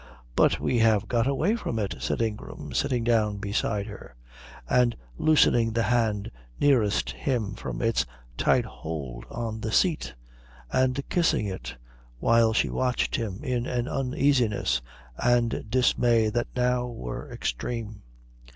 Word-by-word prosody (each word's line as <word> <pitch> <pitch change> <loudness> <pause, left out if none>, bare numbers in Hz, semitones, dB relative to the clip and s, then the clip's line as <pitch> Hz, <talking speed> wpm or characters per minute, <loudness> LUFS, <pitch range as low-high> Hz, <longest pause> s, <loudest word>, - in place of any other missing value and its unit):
"But - - +4
we 120 - +1
have 110 -3 +3
got 120 0 +1
away 155 +10 +1
from 125 - -3
it," 100 -8 -2
said 65 - -1
Ingram, 110 -2 -5
sitting 125 -3 0
down 110 -3 +2
beside 100 0 -1
her 100 - -10 0.5
and 125 -2 +3 0.2
loosening 120 -7 +4
the 115 0 +1
hand 110 -4 0 0.3
nearest 120 -8 +3
him 115 -7 -2
from - - -5
its 115 0 +2 0.3
tight - - +2
hold 70 -7 -6
on 115 -2 -4
the 110 - -3
seat 155 - +1 0.6
and 130 +2 +1
kissing 170 -10 +2
it, 95 -2 -5 0.4
while 115 - +4
she 110 - +2
watched 125 -1 0
him 110 -1 -3
in 125 -3 -1
an 120 0 -1
uneasiness 125 - +1 0.4
and 120 -2 +1
dismay 120 -2 +3
that 120 +2 -1
now 125 0 +1
were 60 - -6
extreme. 110 - -4
115 Hz, 135 wpm, -26 LUFS, 105-125 Hz, 0.6 s, But